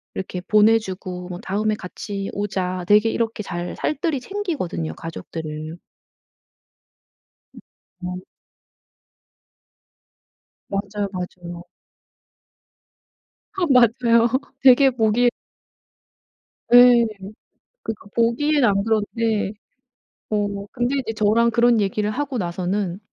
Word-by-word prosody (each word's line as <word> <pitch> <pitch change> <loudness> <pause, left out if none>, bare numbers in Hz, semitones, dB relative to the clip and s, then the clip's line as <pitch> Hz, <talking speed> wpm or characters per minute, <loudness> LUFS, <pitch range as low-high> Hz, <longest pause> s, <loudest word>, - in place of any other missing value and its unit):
이렇게 185 -1 -5
보내 215 +4 +4
주고 185 -3 -7
뭐 175 0 -6
"다음에 210 +3 -1
같이 195 +1 -6
오자." 185 -3 -3
되게 210 +2 +5
이렇게 225 -2 -2
잘 175 -1 -5
살뜰히 305 -1 -1
챙기거든요, 255 - -4
가족들을. 160 -1 -7 1.8
으 - - -12 0.5
어. 180 0 -4 2.5
맞아요, 200 +1 -3
맞아요. 175 -1 -7 1.9
아 380 - -3
맞아요. 235 -2 +4 0.3
되게 265 +1 +7
보기 240 0 +2 1.4
예. 245 -1 +8 0.8
그러니까 225 -2 -6
보기엔 255 +5 +2
안 200 -3 +3
그런데 220 -1 0 0.8
어 205 -1 -2
근데 245 +2 -1
이제 225 -3 -4
저랑 220 +2 +3
그런 235 -1 +4
얘기를 205 +1 -1
하고 270 +2 -3
나서는 185 +1 -2
210 Hz, 200 characters per minute, -22 LUFS, 185-235 Hz, 2.5 s, 예